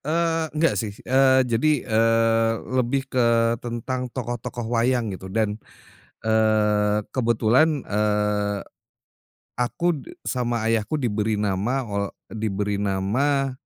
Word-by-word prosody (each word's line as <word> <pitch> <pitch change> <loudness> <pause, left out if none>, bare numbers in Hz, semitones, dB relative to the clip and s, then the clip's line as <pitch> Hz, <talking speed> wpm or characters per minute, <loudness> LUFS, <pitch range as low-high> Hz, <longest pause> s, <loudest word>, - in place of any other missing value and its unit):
Eee, 165 0 0
enggak 165 +2 +3
sih, 105 -2 -6
eee, 130 0 +4
jadi, 125 +4 +1
eee, 115 0 +3 0.2
lebih 130 +2 0
ke 115 -3 +2
tentang 125 +2 -4
tokoh-tokoh 120 -1 -5
wayang 120 -2 +1
gitu, 95 0 -8
dan, 110 +1 -1 0.6
eee, 105 -1 +2
kebetulan, 125 +5 +2
eee, 105 -1 0 1.0
aku 170 +8 +1
de 350 - -12
sama 120 -3 -1
ayahku 115 +4 0
diberi 110 -6 0
nama 105 +6 -1
ol 100 -3 -2 0.3
diberi 105 -2 -2
nama 120 +9 0
115 Hz, 110 wpm, -23 LUFS, 105-130 Hz, 1.0 s, eee